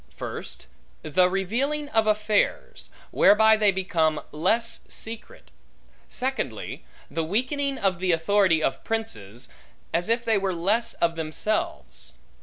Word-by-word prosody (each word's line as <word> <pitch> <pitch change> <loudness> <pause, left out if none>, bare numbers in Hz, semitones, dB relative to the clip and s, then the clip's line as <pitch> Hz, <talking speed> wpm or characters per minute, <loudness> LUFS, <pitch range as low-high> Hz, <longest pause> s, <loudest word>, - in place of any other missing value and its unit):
First, - - -6 0.4
the 180 +4 +3
revealing 250 +11 -1
of 220 -4 +2
affairs, 215 - 0 0.2
whereby 220 +1 +6
they 210 -2 +4
become 170 -5 0
less 230 +10 +1
secret. 230 - -8 0.6
Secondly, 265 +1 -3 0.3
the 165 - -1
weakening 265 - -1
of 190 -3 0
the 185 0 +1
authority 170 -1 +3
of - - -1
princes, 125 - -4 0.5
as 175 +5 0
if 235 +1 +1
they 220 -3 +3
were 195 -2 -1
less 215 +7 0
of 170 0 +1
themselves. 165 +7 -2
205 Hz, 120 wpm, -25 LUFS, 170-230 Hz, 0.6 s, whereby